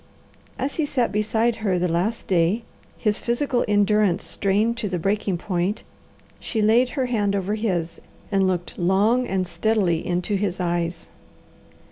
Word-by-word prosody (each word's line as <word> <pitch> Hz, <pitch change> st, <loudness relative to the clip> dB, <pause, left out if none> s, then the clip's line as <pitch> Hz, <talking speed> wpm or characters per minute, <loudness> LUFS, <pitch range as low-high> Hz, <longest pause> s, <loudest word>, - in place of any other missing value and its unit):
As 275 Hz, +2 st, -3 dB
he 315 Hz, -, +1 dB
sat 250 Hz, -4 st, 0 dB
beside 220 Hz, +2 st, +1 dB
her 200 Hz, -5 st, 0 dB
the 180 Hz, +1 st, +1 dB
last 180 Hz, +7 st, -1 dB
day, 185 Hz, +5 st, +1 dB, 0.3 s
his 210 Hz, -2 st, +1 dB
physical 245 Hz, +1 st, 0 dB
endurance 205 Hz, -2 st, +2 dB
strained 210 Hz, +4 st, 0 dB
to 210 Hz, -3 st, -2 dB
the 180 Hz, -, -1 dB
breaking 195 Hz, +1 st, 0 dB
point, 180 Hz, +3 st, -2 dB, 0.6 s
she 225 Hz, -, -3 dB
laid 225 Hz, +4 st, +4 dB
her 260 Hz, -, +2 dB
hand 205 Hz, -5 st, 0 dB
over 200 Hz, +1 st, -1 dB
his, 185 Hz, -7 st, -2 dB, 0.3 s
and 195 Hz, -1 st, +3 dB
looked 180 Hz, -2 st, -3 dB
long 205 Hz, +8 st, +2 dB
and 185 Hz, -1 st, -1 dB
steadily 185 Hz, -4 st, +1 dB
into 180 Hz, +3 st, -1 dB
his 190 Hz, -2 st, -2 dB
eyes. 175 Hz, -1 st, -2 dB
205 Hz, 150 wpm, -23 LUFS, 180-225 Hz, 0.6 s, laid